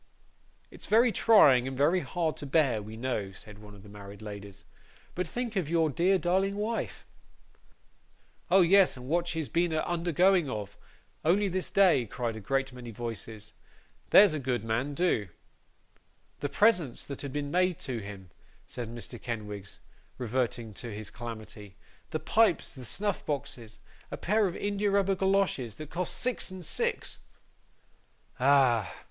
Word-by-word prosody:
'It's - - -11
very 230 +2 +5
trying, 140 - +6
and 130 -1 -5
very 160 +7 +3
hard 170 -3 -2
to 145 - -7
bear, 135 -7 +2
we 110 +2 -9
know,' 115 -5 -2
said 105 +2 -11
one 105 -1 -13
of 100 - -15
the - - -14
married 100 0 -11
ladies; 100 -2 -9 0.5
'but 180 - -2
think 240 -2 -4
of 180 -6 -1
your 165 -2 +2
dear 180 +6 +3
darling 190 +3 +1
wife.' 215 +3 -3 1.4
'Oh 190 +2 +6
yes, 185 -3 +5
and 125 0 -9
what 170 +4 +1
she's 160 -3 -2
been 170 0 +1
a 155 0 +1
undergoing 175 -1 +2
of, 105 -3 -5 0.5
only 195 +6 +3
this 185 0 -2
day,' 175 - +4
cried 120 0 -3
a - - -6
great 135 +6 -1
many 125 -1 -9
voices. 110 -1 -7 0.6
'There's 195 -4 +7
a 155 - -2
good 125 -4 -2
man, 120 +6 -1
do.' 155 - +1 1.1
'The 145 - -2
presents 180 - +2
that 140 - -6
have 140 - -5
been 145 0 -3
made 180 -1 +2
to 125 -3 -3
him,' 100 -4 -9 0.3
said 120 -2 -6
Mr. 120 0 -5
Kenwigs, 105 -4 -6 0.4
reverting 120 -2 -2
to 120 +3 -7
his 105 0 -7
calamity, 110 -4 -8 0.3
'the - - -2
pipes, 220 -6 +2
the 130 -2 -10
snuff 205 - -2
boxes 135 -6 -4 0.3
a - - -5
pair 210 +2 +2
of 175 - -5
india 205 0 0
rubber 195 -1 +2
goloshes, 190 - 0
that 155 -1 -9
cost 180 0 -1
six 250 -5 0
and 185 -2 -8
six - - -2 0.6
' - - -36
'Ah! 130 -5 +4
140 Hz, 160 wpm, -29 LUFS, 115-180 Hz, 1.4 s, There's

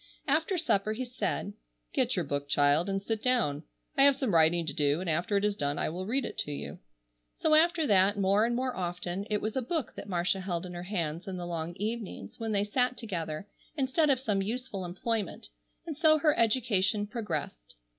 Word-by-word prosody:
After 315 +6 +1
supper 215 - +1
he 255 +4 -4
said: 250 +1 -3 0.4
"Get - - +2
your - - -1
book, 145 0 -3
child, 145 +6 +3
and 195 0 -2
sit 220 0 -2
down. 225 - +2 0.3
I 275 - +3
have 280 0 +7
some 260 -7 -1
writing 165 +1 +5
to 150 - -1
do, 145 +1 +1
and 185 - -5
after 175 +5 +1
it 200 - +1
is 210 -1 +1
done 145 -4 -1
I - - 0
will 185 +4 -5
read 255 +3 +1
it - - -6
to 150 - -2
you." 145 - -6 0.6
So 310 - +2
after 325 +1 +4
that, 200 -3 +4
more 200 +2 +3
and 235 +1 +1
more 255 0 -1
often, 180 +2 -3
it 210 -1 0
was 215 0 -2
a 260 - +1
book 285 +1 -2
that - - -9
Marcia 180 +1 0
held 185 -2 -3
in 180 - -7
her 175 - -6
hands 175 -3 -3
in 190 -1 -4
the 175 - -5
long 170 0 -4
evenings 210 - -5
when 225 -1 -2
they 200 -1 +2
sat 250 +4 0
together, 180 -5 -4 0.3
instead 285 +3 +2
of 265 -3 +3
some 210 -6 0
useful 215 -2 -4
employment, 210 +4 -3 0.4
and 320 -3 -5
so 310 0 +5
her 305 -1 +3
education 215 -3 +2
progressed. 170 - -5
205 Hz, 210 wpm, -30 LUFS, 175-250 Hz, 0.6 s, have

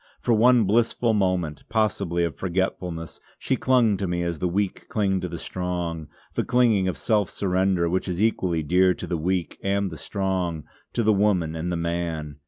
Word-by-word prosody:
For 120 - +1
one 120 +1 +5
blissful 115 +2 +2
moment, 90 -7 0
possibly 100 -6 0
of 85 -4 -2
forgetfulness, 90 -2 -3 0.2
she - - 0
clung 120 -6 +3
to 95 - -2
me 85 0 -1
as 85 -2 -3
the 90 - 0
weak 95 +2 -2
cling 95 -3 0
to 90 - -2
the 85 - -5
strong, 85 -3 -4 0.3
the - - 0
clinging 115 -6 +3
of 90 - -2
self 105 -5 +1
surrender 95 -2 +1
which 90 +3 -1
is 90 -1 -3
equally 90 -7 +1
dear 90 +3 +3
to - - -6
the 85 - -2
weak 90 +2 -2
and 100 -1 0
the 80 - -8
strong, 95 -5 -2 0.3
to 120 - 0
the 110 0 +4
woman 95 -6 +1
and 85 +2 -3
the 85 - -1
man. 85 -3 -3
90 Hz, 190 wpm, -24 LUFS, 85-100 Hz, 0.3 s, one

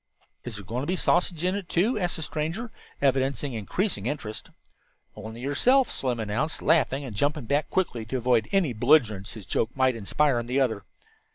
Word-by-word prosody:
"Is 120 -3 -6
there 100 -2 -8
going 115 +7 -3
to 140 - -4
be 185 - +1
a - - -5
sausage 175 -1 +1
in 185 +1 +2
it, 200 -4 -4
too?" 210 +7 +2
asked 175 -2 -1
the 160 - -4
stranger, 165 +11 -3 0.3
evidencing 135 0 +1
increasing 115 - -2
interest. 115 -6 -5 0.7
"Only 110 +2 -8
yourself," 245 - +3
Slim 125 -3 -1
announced, 110 +9 -2
laughing 140 -3 +2
and 115 -6 -7
jumping 145 +4 0
back 145 +6 0
quickly 165 -12 -1
to 130 +4 -2
avoid 125 -2 +2
any 185 -10 +2
belligerency 115 -5 +2
his 105 -4 -8
joke 110 - 0
might 130 -1 +3
inspire 120 +5 +1
in 120 - -5
the 130 +3 +1
other. 110 -7 0
135 Hz, 190 wpm, -26 LUFS, 115-160 Hz, 0.7 s, yourself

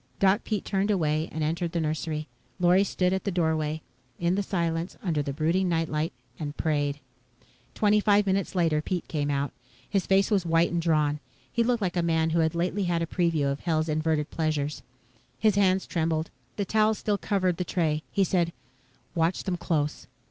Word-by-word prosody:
Doc 195 +2 +3
Pete 210 -4 -2
turned 195 +1 0
away 160 -5 +1
and 160 - -2
entered 165 +2 -1
the 170 - 0
nursery. 155 0 -2 0.3
Lorry 180 +2 +5
stood 185 -2 0
at 190 - -1
the - - -1
doorway, 160 -3 0 0.3
in 170 +1 +1
the 200 - +1
silence, 170 -3 -2
under 165 -6 0
the 140 - -3
brooding 165 +6 +1
night 165 -1 0
light, 155 +1 -1 0.3
and 145 -1 -5
prayed. 145 -2 0 0.8
Twenty 210 0 +4
five 205 0 +4
minutes 195 0 0
later, 165 -4 +2
Pete 175 +2 -3
came 145 -2 -1
out. 140 0 0 0.4
His 195 -3 0
face 195 +2 +3
was 200 -4 +3
white 165 0 +2
and 170 0 0
drawn. 150 -3 +2 0.3
He 235 - +2
looked 235 -2 +1
like 180 -1 -1
a 175 - +2
man 160 -1 +1
who 170 - +2
had 160 0 +1
lately 185 +3 0
had 170 -1 +1
a - - 0
preview 165 -4 +1
of 140 - -3
Hell's 160 -2 0
inverted 155 -1 0
pleasures. 150 -2 -1 0.6
His 215 -1 +3
hands 190 -1 +3
trembled. 160 -1 -1 0.2
The 200 - -1
towel 215 +2 +3
still 205 -1 -1
covered 185 -4 0
the 180 - -1
tray. 160 -4 0
He 200 - +2
said, 175 -3 +1 0.6
"Watch 170 +1 +1
them 185 -2 -1
close. 155 -4 -1
170 Hz, 190 wpm, -27 LUFS, 155-190 Hz, 0.8 s, Lorry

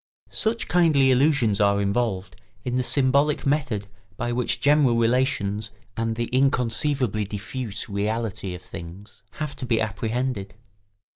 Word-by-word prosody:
] - - -75
Such 225 +1 -1
kindly 155 -7 +4
illusions 130 -6 +3
are 100 0 +3
involved 100 -2 -1 0.3
in 125 -1 -1
the 130 - +2
symbolic 140 +3 +2
method 135 -8 0 0.3
by 120 - -2
which 120 0 0
general 145 -4 +4
relations 115 -4 +1 0.3
and 115 0 -1
the 120 +1 -1
inconceivably 125 -3 +1
diffuse 105 +2 -5
reality 105 -2 -2
of 90 - -11
things 90 +2 -10
have 150 -2 -5
to 130 - -5
be 115 -2 +2
apprehended. 110 0 -2
120 Hz, 135 wpm, -24 LUFS, 105-135 Hz, 0.3 s, kindly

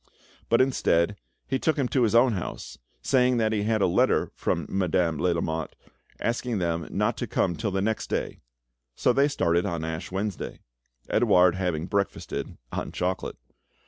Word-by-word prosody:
But, 115 - +5
instead, 105 -8 +2 0.3
he 135 - -1
took 160 +3 +1
him 135 -3 +1
to 130 - +1
his 115 -1 +2
own 120 0 +5
house, 95 - -6 0.2
saying 125 -1 +3
that 110 -1 +2
he 105 -2 0
had 110 -1 +1
a - - +5
letter 85 - +2
from - - -1
Madame 90 -4 +1
de - - -4
Lamotte 80 -2 -2 0.4
asking 120 -1 -1
them 85 -2 -1
not - - 0
to - - -3
come 85 - 0
till 110 -2 -2
the 95 0 -1
next 110 +1 -1
day; - - -2 0.6
so 125 - +2
they 140 +3 +4
started 85 - +1
on 85 -4 -3
Ash 80 +3 -5
Wednesday, 100 +1 -4 0.5
Edouard 90 -1 +4
having 90 -4 -1
breakfasted 100 +1 -3
on - - -4
chocolate. 90 +1 -2
95 Hz, 170 wpm, -26 LUFS, 85-115 Hz, 0.6 s, But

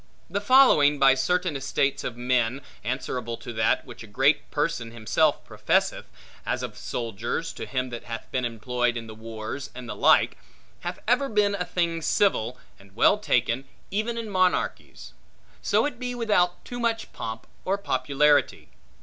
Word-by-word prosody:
The 200 +2 -1
following 205 - +6
by 135 -1 +6
certain 180 +5 0
estates 135 0 0
of 120 - -4
men, 125 +1 +1 0.2
answerable 120 -1 -3
to 120 +1 -8
that, 110 0 +1
which - - -11
a 110 - -9
great 135 +8 +2
person 150 -6 -1
himself 115 -2 +1
professeth - - 0 0.4
(as - - -2
of - - -5
soldiers, 115 +7 -4
to - - -7
him 130 -2 -2
that 120 - -7
hath 115 -1 -6
been 130 - -1
employed 120 +1 -1
in 115 - -6
the 110 - -9
wars, 110 +4 -6
and 125 -1 -8
the - - -5
like), - - +4 0.4
hath - - -5
ever 255 +4 +2
been 210 -2 +2
a 180 -3 -2
thing 170 -2 -1
civil, 125 - +1 0.2
and 100 0 -19
well 205 - +4
taken, 125 - +1 0.3
even 220 +4 -1
in 230 -1 -4
monarchies; 185 -3 -1 0.5
so - - +2
it 285 -5 -4
be 250 -1 -3
without 205 -7 +1
too 245 - -6
much 230 -1 -1
pomp 110 0 -6 0.2
or 195 +2 0
popularity. 145 -3 +1
135 Hz, 165 wpm, -26 LUFS, 120-190 Hz, 0.5 s, following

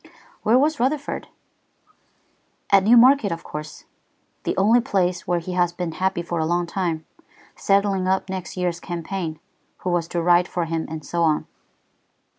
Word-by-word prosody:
"Where 225 +3 +4
was 295 +3 +2
Rutherford?" 280 +4 -1 1.4
"At 200 -1 +7
Newmarket, 240 +1 +6
of 165 - -4
course, 150 0 -8 0.6
the - - -1
only 225 +5 +4
place 185 -7 -1
where 175 0 +1
he 175 +2 -5
has 175 -1 +2
been 175 -1 -3
happy 190 +1 -1
for 170 -1 -3
a 160 - +1
long 175 +1 +1
time, 170 -3 -2 0.5
settling 195 -1 +1
up 190 0 +1
next 185 -1 -6
year's 175 -1 -1
campaign, 170 -2 -5 0.4
who 180 - -1
was 170 -2 0
to 170 0 -2
ride 175 +1 +4
for 175 -2 -2
him, 165 0 -3
and 155 -1 -7
so 170 - -2
on." 155 -2 +2
180 Hz, 160 wpm, -23 LUFS, 170-195 Hz, 1.4 s, At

